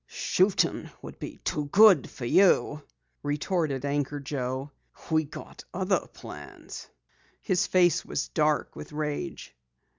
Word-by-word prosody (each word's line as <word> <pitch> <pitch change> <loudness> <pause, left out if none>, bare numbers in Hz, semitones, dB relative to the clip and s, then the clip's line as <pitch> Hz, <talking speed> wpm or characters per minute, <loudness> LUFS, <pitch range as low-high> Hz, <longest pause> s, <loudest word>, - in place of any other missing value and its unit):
"Shootin' 190 +1 +1
would - - -9
be - - -7
too 150 - -1
good 195 - +6
for 120 - -7
you," 155 -1 +4 0.4
retorted 145 -1 -1
Anchor 145 0 -1
Joe. 135 0 -4 0.4
"We 160 -1 +3
got 140 - -10
other 190 +1 0
plans." - - -10 0.5
His 190 -1 +1
face 175 -3 +3
was - - -3
dark 155 -1 +1
with - - -9
rage. 150 -1 -4
150 Hz, 120 wpm, -27 LUFS, 145-180 Hz, 0.5 s, good